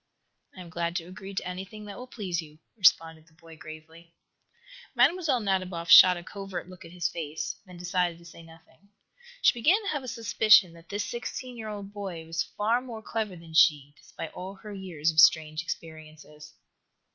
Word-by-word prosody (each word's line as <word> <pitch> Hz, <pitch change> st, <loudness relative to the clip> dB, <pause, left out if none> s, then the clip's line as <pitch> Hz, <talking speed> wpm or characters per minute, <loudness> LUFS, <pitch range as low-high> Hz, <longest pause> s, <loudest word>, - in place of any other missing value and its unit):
"I -, -, -8 dB
am 170 Hz, -2 st, -11 dB
glad 170 Hz, +1 st, -2 dB
to 175 Hz, -, -2 dB
agree 190 Hz, +2 st, -10 dB
to 190 Hz, -, -3 dB
anything 190 Hz, +4 st, -7 dB
that 205 Hz, -1 st, -8 dB
will 250 Hz, +4 st, -9 dB
please 185 Hz, -8 st, -3 dB
you," 155 Hz, -1 st, -15 dB, 0.2 s
responded 165 Hz, -5 st, +3 dB
the 160 Hz, -, -25 dB
boy, 165 Hz, -1 st, -15 dB
gravely. 160 Hz, +2 st, -13 dB, 0.8 s
Mlle. 290 Hz, +2 st, +3 dB
Nadiboff 185 Hz, -4 st, -2 dB
shot 180 Hz, -1 st, +10 dB
a 175 Hz, -, -8 dB
covert 195 Hz, -1 st, -7 dB
look 185 Hz, 0 st, -13 dB
at 165 Hz, -, -12 dB
his 175 Hz, -1 st, -1 dB
face, 160 Hz, -2 st, -5 dB
then 180 Hz, -1 st, -12 dB
decided 180 Hz, -1 st, -1 dB
to 170 Hz, -, -18 dB
say 170 Hz, 0 st, -13 dB
nothing. 165 Hz, +4 st, -19 dB, 0.5 s
She -, -, +6 dB
began 305 Hz, -, +3 dB
to 400 Hz, -, -3 dB
have 290 Hz, -, -2 dB
a 255 Hz, -, -9 dB
suspicion 220 Hz, -5 st, +4 dB
that 170 Hz, 0 st, -17 dB
this 205 Hz, 0 st, -2 dB
sixteen 245 Hz, +1 st, -6 dB
year 220 Hz, -2 st, -7 dB
old 205 Hz, -1 st, -7 dB
boy 190 Hz, -6 st, -6 dB
was 165 Hz, 0 st, -2 dB
far 225 Hz, +4 st, 0 dB
more 230 Hz, -4 st, -9 dB
clever 220 Hz, -5 st, -3 dB
than 165 Hz, -1 st, -13 dB
she, 145 Hz, -3 st, +4 dB
despite 160 Hz, -, -9 dB
all 190 Hz, +2 st, -7 dB
her 210 Hz, +1 st, -10 dB
years 175 Hz, -5 st, -2 dB
of 155 Hz, -, 0 dB
strange 155 Hz, -1 st, +5 dB
experiences. 155 Hz, -2 st, -9 dB
180 Hz, 190 wpm, -27 LUFS, 165-205 Hz, 0.8 s, shot